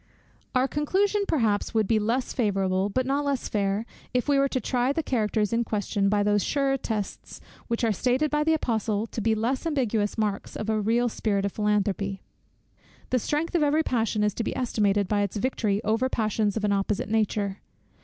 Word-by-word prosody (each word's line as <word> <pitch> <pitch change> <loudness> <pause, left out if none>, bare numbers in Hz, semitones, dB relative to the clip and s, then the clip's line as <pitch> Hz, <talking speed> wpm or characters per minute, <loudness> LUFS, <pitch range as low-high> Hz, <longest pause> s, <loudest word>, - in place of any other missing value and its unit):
Our 255 +1 +3
conclusion, 390 +8 +1
perhaps, 225 -6 0
would 220 -1 +3
be 220 -2 +3
less 235 +4 -1
favourable, 195 -4 +1
but 255 +5 0
not 280 +2 0
less 280 -3 -1
fair, 200 +1 0 0.3
if 250 - +1
we 285 -1 +3
were 275 - +4
to 260 - -1
try 250 0 0
the 320 +3 -1
characters 215 -4 0
in 235 +1 +2
question 205 -2 0
by 205 0 +2
those 205 -1 +2
surer 275 -1 +1
tests, 220 -6 -5 0.3
which 235 0 -2
are 225 - +3
stated 255 +8 +1
by 300 0 +2
the 320 +1 +3
Apostle 220 -6 -1
to 230 - -5
be 220 +1 +2
less 240 +5 -1
ambiguous 230 -9 0
marks 210 -2 -2
of 215 +1 -2
a 215 -1 +1
real 235 +3 +2
spirit 205 -3 -1
of 200 - -1
philanthropy. 200 -2 -1 0.9
The 255 - +3
strength 300 +7 -1
of 345 - +2
every 300 +2 +3
passion 225 -5 0
is 210 -1 +1
to 230 - -3
be - - -3
estimated 205 -5 +1
by 205 +1 +1
its 200 0 -2
victory 210 -3 0
over 225 +5 +1
passions 215 -3 0
of 215 - -3
an 205 - +2
opposite 200 +1 -1
nature. 205 -2 0
220 Hz, 195 wpm, -26 LUFS, 205-255 Hz, 0.9 s, were